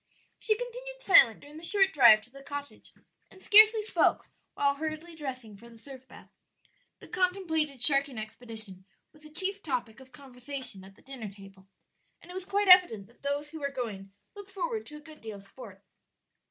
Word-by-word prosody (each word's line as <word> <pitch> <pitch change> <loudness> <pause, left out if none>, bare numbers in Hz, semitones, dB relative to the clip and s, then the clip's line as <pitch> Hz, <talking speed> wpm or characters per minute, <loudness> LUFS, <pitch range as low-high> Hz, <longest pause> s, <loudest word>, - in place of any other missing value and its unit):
She 430 -1 +1
continued - - -8
silent 385 - +5
during 295 +1 -14
the 320 - -12
short 385 +2 +2
drive 215 -7 +7
to 245 - -19
the 275 +1 -14
cottage, 285 0 -9 0.4
and 380 - -18
scarcely 430 +2 +7
spoke 440 - 0 0.3
while 280 0 +1
hurriedly 310 +3 -6
dressing 255 -8 -8
for 235 +4 -16
the 230 - -16
surf 260 +2 -12
bath. - - -16 0.7
The - - -15
contemplated 320 -8 -1
sharking 275 -1 +3
expedition 215 -3 -7 0.3
was 305 - -21
the 305 - -14
chief 380 +6 +1
topic 250 - -4
of 260 -1 -17
conversation 255 -5 -7
at 195 0 -16
the - - -24
dinner 260 -6 -8
table, 195 -1 -16 0.5
and 355 - -14
it - - -10
was 375 0 -7
quite 400 +1 -1
evident 360 - +6
that 235 - -26
those 285 +1 -3
who 320 - -9
were 280 -1 -3
going 210 -8 -7 0.2
looked 405 -1 -11
forward 435 +3 -4
to 300 - -11
a - - -14
good 310 -1 -15
deal 220 -2 -8
of 195 - -15
sport. 200 -2 -14
280 Hz, 190 wpm, -28 LUFS, 230-365 Hz, 0.7 s, drive